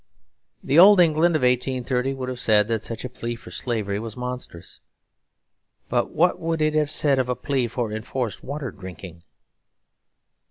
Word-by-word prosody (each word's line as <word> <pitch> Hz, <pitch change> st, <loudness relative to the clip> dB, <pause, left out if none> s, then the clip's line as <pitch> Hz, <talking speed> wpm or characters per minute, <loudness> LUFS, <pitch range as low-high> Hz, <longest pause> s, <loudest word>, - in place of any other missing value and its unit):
The 140 Hz, +5 st, +3 dB
old 195 Hz, +2 st, +8 dB
England 165 Hz, 0 st, +4 dB
of 155 Hz, -, 0 dB
1830 125 Hz, +1 st, 0 dB
would 130 Hz, -1 st, -5 dB
have 125 Hz, -1 st, -5 dB
said 105 Hz, -3 st, +3 dB
that 115 Hz, -2 st, 0 dB
such 115 Hz, +2 st, -6 dB
a -, -, -4 dB
plea 120 Hz, -1 st, -5 dB
for 115 Hz, -, -13 dB
slavery 105 Hz, -5 st, -2 dB
was 115 Hz, +1 st, -7 dB
monstrous; 125 Hz, -8 st, -7 dB, 1.1 s
but -, -, 0 dB
what 175 Hz, +3 st, +2 dB
would 165 Hz, 0 st, -2 dB
it 155 Hz, 0 st, +1 dB
have 155 Hz, -1 st, +1 dB
said 145 Hz, -3 st, +2 dB
of 125 Hz, -1 st, -1 dB
a 125 Hz, -, 0 dB
plea 135 Hz, -3 st, -1 dB
for 120 Hz, -1 st, -3 dB
enforced 115 Hz, +1 st, -4 dB
water 140 Hz, -2 st, -5 dB
drinking? 90 Hz, -2 st, -10 dB
125 Hz, 165 wpm, -23 LUFS, 115-145 Hz, 1.1 s, old